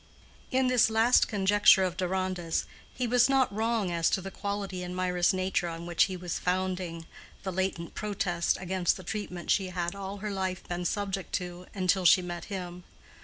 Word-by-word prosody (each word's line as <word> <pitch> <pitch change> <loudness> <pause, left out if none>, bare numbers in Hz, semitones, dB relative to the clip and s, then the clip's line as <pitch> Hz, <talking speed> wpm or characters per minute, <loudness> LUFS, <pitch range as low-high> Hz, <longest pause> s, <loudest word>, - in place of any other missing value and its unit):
In 260 0 +2
this 250 -2 +4
last 225 +3 +4
conjecture 205 -1 +5
of 180 -2 -1
Deronda's 185 -2 -1 0.3
he 250 - -2
was 245 +1 +4
not 265 -5 +3
wrong 220 -3 0
as 170 -1 +2
to - - +1
the 195 +1 -7
quality 200 -2 -4
in 180 0 -5
Mirah's 180 -1 +2
nature 185 -1 0
on 165 0 -6
which 170 -1 +3
he 185 -2 -5
was 175 -1 -4
founding—the 180 0 -4
latent 185 -2 -2
protest 185 -5 -1
against 185 -1 0
the 185 - -10
treatment 180 -2 -4
she 195 -2 +2
had 175 -1 -3
all 200 0 -6
her 210 +1 -4
life 190 -2 -3
being 175 0 -3
subject 195 0 -2
to 180 0 -4
until 185 -1 +1
she 180 +2 +6
met 175 -1 -5
him. 180 -3 -6
185 Hz, 175 wpm, -29 LUFS, 180-200 Hz, 0.3 s, she